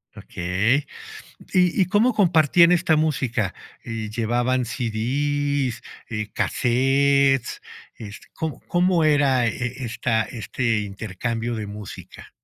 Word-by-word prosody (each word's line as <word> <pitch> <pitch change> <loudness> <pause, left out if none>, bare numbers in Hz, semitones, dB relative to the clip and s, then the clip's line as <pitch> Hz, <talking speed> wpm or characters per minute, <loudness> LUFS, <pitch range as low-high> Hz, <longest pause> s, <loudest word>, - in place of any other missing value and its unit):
Okey. 100 +11 -1 0.7
¿Y 180 +1 +3
y - - +1
cómo 210 +7 +3
compartían 170 - +4
esta 170 -2 +3
música? 125 - 0 0.3
¿Llevaban 120 +3 -1
CDs, 130 +3 -1 0.3
eh, 105 -1 -4
cassettes? 135 +1 +2 0.3
Este, 105 -1 -10
¿cómo 160 -2 -4
cómo 175 -1 +2
era 140 -5 +3
e 125 +3 -3
esta 115 -1 0
este 115 0 -2
intercambio 110 +3 -4
de 110 -2 -4
música? 105 0 -10
125 Hz, 100 wpm, -23 LUFS, 115-145 Hz, 0.7 s, compartían